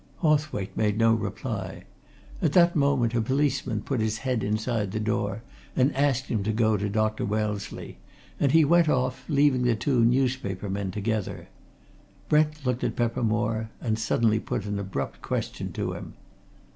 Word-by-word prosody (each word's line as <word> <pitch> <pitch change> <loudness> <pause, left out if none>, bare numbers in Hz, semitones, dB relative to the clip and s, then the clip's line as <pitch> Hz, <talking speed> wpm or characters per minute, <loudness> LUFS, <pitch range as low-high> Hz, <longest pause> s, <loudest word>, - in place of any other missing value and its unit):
Hawthwaite 150 - +1
made 105 -1 +1
no 115 0 +4
reply. 115 - -4 0.6
At - - +1
that 170 -1 +5
moment 140 -5 +2
a 120 - +2
policeman 130 -3 0
put 135 -4 -1
his 110 0 0
head 125 -3 -1
inside 110 0 -1
the 110 - -1
door 105 0 -1 0.3
and 130 +2 +2
asked 135 -2 +2
him 110 -5 -1
to 105 +3 -1
go 110 0 +2
to 105 0 -1
Dr. 110 +1 0
Wellesley, 105 -1 -3 0.4
and 140 - +3
he 160 0 +6
went 170 +1 +4
off, 130 -2 0
leaving 140 -3 +3
the 125 -2 +2
two 120 +2 +1
newspaper 120 -6 0
men 100 0 -2
together. 105 +1 -3 0.8
Brent 150 -1 +2
looked 125 0 0
at - - -1
Peppermore 115 -1 0
and 110 -2 -1
suddenly 110 0 +2
put 105 - -3
an 105 -1 -2
abrupt 95 -9 -4
question - - -3
to - - -2
him. - - -8
115 Hz, 160 wpm, -26 LUFS, 105-135 Hz, 0.8 s, he